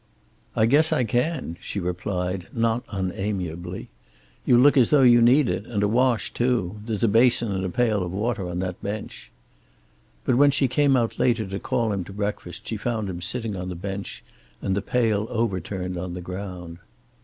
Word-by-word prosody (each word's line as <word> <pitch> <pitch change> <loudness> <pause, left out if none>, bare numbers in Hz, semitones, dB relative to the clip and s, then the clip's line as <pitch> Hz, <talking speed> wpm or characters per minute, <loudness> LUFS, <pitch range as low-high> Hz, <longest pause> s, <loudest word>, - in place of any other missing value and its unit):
"I 110 - +4
guess 150 +7 +4
I 125 - +2
can," 120 - -1
she 100 - -4
replied, 90 0 -3
not 115 +1 0
unamiably. 90 -2 -4 0.6
"You 120 - +6
look 140 +4 +6
as 125 -5 +5
though 145 -3 +5
you 120 -1 +7
need 125 +4 +5
it, 90 +4 -2
and 105 -3 -1
a - - +3
wash, 120 +1 +1
too. 115 -6 0
There's 110 0 -3
a - - +5
basin 115 0 +4
and 95 -1 -2
a 95 - -1
pail 110 0 +1
of 90 -1 -3
water 100 -1 -2
on 90 - -4
that 90 -1 -4
bench." 105 +1 -6 1.0
But 125 - +2
when 145 +1 +6
she 140 -1 +2
came 135 +1 +3
out 115 -2 -1
later 120 -3 +2
to 95 +1 -5
call 120 -2 0
him 95 -2 -2
to 100 - -10
breakfast 100 -3 -4
she 110 - -2
found 110 -3 -2
him 90 -1 -7
sitting 110 +3 -3
on 90 0 -5
the 90 - -5
bench 100 +2 -6 0.4
and 95 -2 -1
the 100 - 0
pail 110 -1 0
overturned 95 -4 -2
on 90 0 -5
the 90 - -5
ground. 90 -2 -7
105 Hz, 190 wpm, -24 LUFS, 90-120 Hz, 1.0 s, you